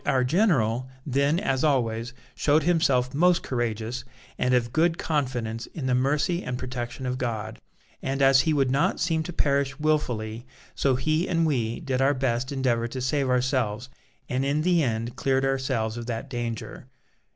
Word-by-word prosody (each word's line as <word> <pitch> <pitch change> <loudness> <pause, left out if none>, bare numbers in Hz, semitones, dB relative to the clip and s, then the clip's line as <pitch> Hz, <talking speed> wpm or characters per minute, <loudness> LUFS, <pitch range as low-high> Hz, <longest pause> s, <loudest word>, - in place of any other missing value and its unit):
"Our 130 -1 +2
general, 130 - +2 0.2
then 140 +4 +2
as 135 -9 0
always, 120 -5 +1 0.2
showed 150 +1 +2
himself 140 -7 +2
most 175 +4 +3
courageous, 120 0 -2 0.3
and 125 0 +2
of 120 -1 0
good 165 +1 +2
confidence 125 -8 -2
in 150 - -4
the 130 - +1
mercy 145 +7 +1
and 125 0 -3
protection 125 0 -5
of 125 0 -2
God; 115 -3 -3 0.4
and 135 +1 -2
as 135 -1 +6
he 160 - +1
would 135 -4 +2
not 135 +2 +1
seem 165 -1 +1
to 160 - -5
perish 140 -4 0
wilfully, 120 -7 -1 0.3
so 135 -2 +1
he 155 +6 0
and 165 -1 +2
we 120 -7 -1
did 130 -1 -1
our 140 +2 +3
best 130 0 -1
endeavour 125 -4 0
to 130 +2 -6
save 130 +1 0
ourselves, 125 -2 0 0.4
and 130 +1 -1
in 145 +2 0
the 175 -1 +3
end 115 -3 -2
cleared 135 0 +1
ourselves 130 -4 -1
of 120 0 -6
that 115 +2 -4
danger." 120 -3 -5
130 Hz, 170 wpm, -26 LUFS, 120-145 Hz, 0.4 s, as